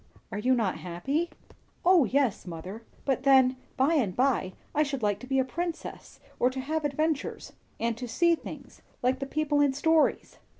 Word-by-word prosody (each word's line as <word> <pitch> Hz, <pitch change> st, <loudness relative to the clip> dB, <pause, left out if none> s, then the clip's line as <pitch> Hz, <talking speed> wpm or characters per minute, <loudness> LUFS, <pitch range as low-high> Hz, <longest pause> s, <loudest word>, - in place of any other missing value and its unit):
"Are 205 Hz, -, -3 dB
you 255 Hz, +4 st, +3 dB
not 220 Hz, -6 st, 0 dB
happy?" 270 Hz, -, -2 dB, 0.6 s
"O 355 Hz, -5 st, +6 dB
yes, 255 Hz, -4 st, 0 dB
mother! 180 Hz, +6 st, -7 dB, 0.2 s
But 270 Hz, -2 st, +1 dB
then, 260 Hz, -1 st, +5 dB, 0.2 s
by 275 Hz, +5 st, +3 dB
and 230 Hz, -, +1 dB
by, 250 Hz, -8 st, +1 dB, 0.2 s
I 300 Hz, -, +2 dB
should 275 Hz, -5 st, -1 dB
like 205 Hz, -1 st, +1 dB
to 255 Hz, -, -10 dB
be 270 Hz, 0 st, 0 dB
a 260 Hz, -, +3 dB
princess, 335 Hz, +5 st, -5 dB, 0.2 s
or 250 Hz, -, +4 dB
to 260 Hz, +1 st, -5 dB
have 305 Hz, +4 st, -2 dB
adventures, 300 Hz, +1 st, -2 dB, 0.3 s
and 230 Hz, 0 st, -1 dB
see 340 Hz, +7 st, +3 dB
things; 330 Hz, -, -8 dB, 0.2 s
like 255 Hz, +1 st, +2 dB
the 275 Hz, -, -4 dB
people 295 Hz, 0 st, +1 dB
in 285 Hz, -2 st, +3 dB
stories." 320 Hz, +3 st, +1 dB
270 Hz, 175 wpm, -28 LUFS, 235-300 Hz, 0.6 s, O